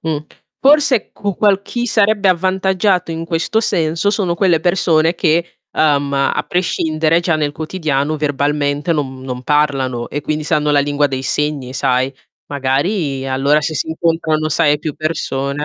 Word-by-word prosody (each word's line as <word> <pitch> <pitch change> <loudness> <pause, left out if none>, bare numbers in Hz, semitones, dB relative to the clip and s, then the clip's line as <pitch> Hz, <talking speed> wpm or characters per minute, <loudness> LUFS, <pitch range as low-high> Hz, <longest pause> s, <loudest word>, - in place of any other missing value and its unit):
Mh, 160 -2 -1 0.4
forse 275 -4 +3
qu 200 -3 -4
qual 200 -2 +3
chi 240 +4 -4
sarebbe 210 -3 +2
avvantaggiato, 185 0 +1
in 165 0 -4
questo 170 +6 0
senso, 165 -2 0
sono 190 -5 0
quelle 175 -3 +2
persone 170 -2 +2
che, 170 +1 0
uhm, 145 -2 +1
a 140 0 0
prescindere 165 -2 +1
già 170 -2 +1
nel 150 -2 -1
quotidiano 155 -2 -2
verbalmente 145 +1 0
non 130 -4 -3
non 125 -1 -6
parlano, 135 -4 0
e 145 - -4
quindi 155 +1 -2
sanno 150 -1 +1
la 145 - +3
lingua 145 +1 +1
dei 130 -1 -4
segni, 140 -2 -2
sai. 130 0 +1 0.4
Magari, 140 +1 -1
allora, 140 +3 +2
se 155 +1 -3
si - - -2
incontrano, 160 -1 0
sai, 150 -1 +2
più 150 -1 -4
persone 145 -2 -2
155 Hz, 155 wpm, -17 LUFS, 145-175 Hz, 0.4 s, forse